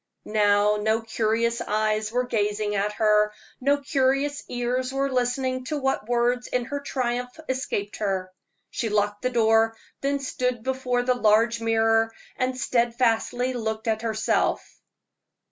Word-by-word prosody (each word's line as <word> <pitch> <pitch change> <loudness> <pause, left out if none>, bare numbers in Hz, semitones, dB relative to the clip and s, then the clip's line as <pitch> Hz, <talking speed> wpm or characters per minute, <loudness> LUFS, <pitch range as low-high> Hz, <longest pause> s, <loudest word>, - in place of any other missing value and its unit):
Now 210 0 +3
no 220 +2 +1
curious 225 +1 0
eyes 215 0 0
were 250 +1 0
gazing 210 -2 -1
at 205 +1 0
her, 210 -1 +3 0.3
no 280 +2 +3
curious 280 0 0
ears 250 +1 -1
were 275 0 -1
listening 255 +1 0
to 300 +2 -2
what 270 -5 -1
words 245 +1 +1
in 250 -1 -1
her 285 +3 -4
triumph 250 -1 -3
escaped 260 -6 -2
her. 190 -3 -2 0.4
She 225 - -2
locked 205 0 0
the 255 - 0
door, 225 -1 +3 0.2
then 280 +1 +1
stood 250 -3 -2
before 255 -1 0
the 250 0 +2
large 230 0 +3
mirror 225 0 +2 0.2
and 255 0 -1
steadfastly 245 0 +1
looked 220 -2 -3
at 220 -1 0
herself. 220 -1 -1
235 Hz, 140 wpm, -25 LUFS, 215-255 Hz, 0.4 s, Now